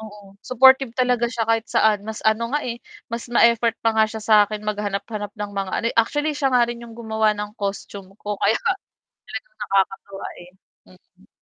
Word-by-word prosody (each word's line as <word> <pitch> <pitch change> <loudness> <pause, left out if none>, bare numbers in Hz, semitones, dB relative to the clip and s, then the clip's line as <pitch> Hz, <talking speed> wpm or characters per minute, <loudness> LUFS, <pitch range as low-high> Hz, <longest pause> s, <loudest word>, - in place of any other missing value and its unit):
Oo, 205 -2 -12
supportive 265 0 +5
talaga 250 -1 +1
siya 230 -1 -2
kahit 225 0 +2
saan, 210 -2 +3
mas 220 0 -6
ano 230 +3 +1
nga 295 - +1
eh, 235 -1 -4 0.3
mas 235 0 -5
ma-effort 235 -1 +4
pa 225 -1 +1
nga 220 - +6
siya 220 0 -6
sakin 210 -1 +3
maghanap-hanap 205 0 -4
ng 210 -2 -6
mga 195 -1 -2
ano - - -1
eh - - -7
actually 295 +6 +1
siya 270 -2 0
nga 240 -1 +4
rin 235 0 -6
yung 230 - -11
gumawa 220 -2 0
ng 210 +1 -6
costume 200 -1 -5
ko 210 0 -3
kaya 205 +3 +1 0.6
talagang - - -9
nakakatuwa 195 0 -1
eh, 175 0 -13 0.4
mm. - - -23
220 Hz, 185 wpm, -22 LUFS, 205-235 Hz, 0.6 s, nga